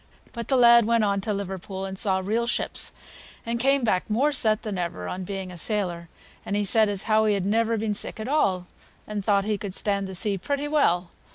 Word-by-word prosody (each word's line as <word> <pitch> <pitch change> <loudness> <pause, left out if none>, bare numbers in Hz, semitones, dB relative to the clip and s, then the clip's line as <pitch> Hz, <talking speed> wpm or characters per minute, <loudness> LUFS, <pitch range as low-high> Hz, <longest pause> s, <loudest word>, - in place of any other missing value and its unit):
But 235 -1 -6
the 270 - +2
lad 235 -2 +7
went 230 0 +2
on 200 -1 +1
to 210 - -3
Liverpool 195 -1 -5
and 190 0 -5
saw 190 -1 +1
real 230 +4 0
ships, - - +1 0.5
and 235 0 -2
came 270 +2 +2
back 190 -4 0
more 260 +8 +2
set 215 -6 +1
than 205 -4 -4
ever 165 - -4
on 185 0 -5
being 190 -1 -5
a 175 - -7
sailor, 175 -5 -2 0.3
and 200 - -3
he 205 0 0
said 215 +2 +4
as 200 -2 -2
how 220 0 +2
he 210 -1 +2
had 195 -2 -2
never 225 +2 +1
been 215 0 -1
sick 205 - -4
at 220 - -5
all, 195 -11 +1 0.4
and 210 -1 -4
thought 200 -1 +2
he 210 -1 -1
could 195 -2 -5
stand 200 -1 0
the 190 - -7
sea 200 +1 0
pretty 285 +8 -2
well. 180 - +1
205 Hz, 225 wpm, -25 LUFS, 190-230 Hz, 0.5 s, lad